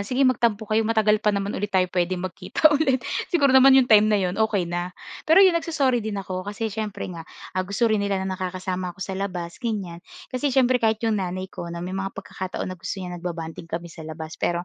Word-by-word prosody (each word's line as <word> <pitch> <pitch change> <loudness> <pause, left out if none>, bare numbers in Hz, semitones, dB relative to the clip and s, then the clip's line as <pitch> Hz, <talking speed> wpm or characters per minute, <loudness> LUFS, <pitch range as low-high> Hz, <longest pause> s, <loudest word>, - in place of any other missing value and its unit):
sige 265 +2 +2
magtampo 230 -4 +2
kayo 215 +1 +1
matagal 215 -1 +2
pa 215 - +1
naman 200 0 0
ulit 205 +2 -2
tayo 190 -2 +3
puwedeng 180 0 0
magkita 185 - +2
ulit. 265 -5 +1 0.2
Siguro 285 -7 +3
naman 265 0 +8
'yung 265 - +6
time 215 -3 +6
na 210 - +3
'yun 190 +1 -1
okey 210 -4 +2
na. 175 +1 -4 0.3
Pero 375 +5 +8
'yung 375 - +6
nagso-sorry 275 -7 +1
din 215 -1 -4
ako. 185 -2 -4
Kasi 205 +3 -4
siyempre 215 -1 -4
nga, 170 - -7 0.3
ah, 185 - 0
gusto 200 +4 0
rin 215 -2 +2
nila 200 -1 0
na 190 - -2
nakakasama 185 -1 -4
ako - - -16
sa 190 - -5
labas, 180 -2 -4
ganyan. 200 -8 -3 0.3
Kasi 255 +3 0
siyempre 255 -2 +3
kahit 220 0 +1
'yung 220 -3 +1
nanay 185 0 -3
ko 170 - -6
na 170 0 -5
may 180 - -5
mga 195 0 -2
pagkakataon 185 -1 -5
na 185 -2 -7
gusto - - -4
niya 180 - -6
nagba-bonding 170 -1 -6
kami 170 0 -5
sa 165 - -12
labas. 160 0 -8
Pero 175 0 0
200 Hz, 225 wpm, -24 LUFS, 180-230 Hz, 0.3 s, naman